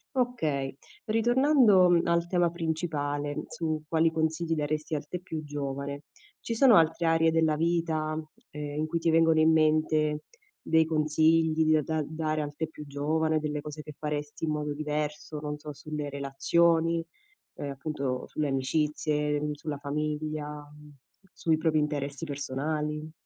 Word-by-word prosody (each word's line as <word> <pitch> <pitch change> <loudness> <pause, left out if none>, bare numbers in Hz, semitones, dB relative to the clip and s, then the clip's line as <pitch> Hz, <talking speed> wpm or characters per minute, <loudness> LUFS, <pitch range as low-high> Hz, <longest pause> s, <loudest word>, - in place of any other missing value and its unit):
Okay. 155 - -1 0.3
Ritornando, 235 -3 +5
mhmm, 170 -1 +3
al 170 0 +2
tema 175 -1 +2
principale, 155 -4 -2
su 155 -2 -3
quali 160 +1 +3
consigli 160 +1 0
daresti 155 +1 -2
al 145 0 -4
te 180 - -4
più 160 -3 -6
giovane, 140 0 -5 0.3
ci 230 - -4
sono 240 -1 +6
altre 165 +1 +3
aree 165 0 +4
della 160 -1 +2
vita, 160 -1 0 0.3
ehm, 145 0 -6
in 155 - 0
cui 170 - -1
ti 165 0 +1
vengono 165 0 +4
in 160 +1 +5
mente 155 -1 +2 0.4
dei 160 0 +3
consigli 160 +1 +3
di 155 0 +4
a 155 - +2
da 160 +1 -1
dare 155 0 -2
al 145 0 -5
te 160 +1 -2
più 150 -2 -10
giovane, 155 +3 0
delle 150 -1 -3
cose 150 0 -7
che 150 - -9
faresti 150 0 -3
in 155 - -1
modo 150 -1 -2
diverso, 150 0 -3
non 150 0 -4
so, 150 0 -7
sulle 150 0 -5
relazioni, 165 +4 +2 0.5
ehm, 145 - -4
appunto 140 -2 -3
sulle 155 -1 -2
amicizie, 150 +2 0
mhmm, 150 0 -2
sulla 145 0 -5
famiglia, 150 +1 -3
mhmm, 150 0 -10 0.4
sui 160 -1 +1
propri 160 -1 +1
interessi 145 0 -2
personali? 150 +2 -3
155 Hz, 155 wpm, -28 LUFS, 150-160 Hz, 0.5 s, sono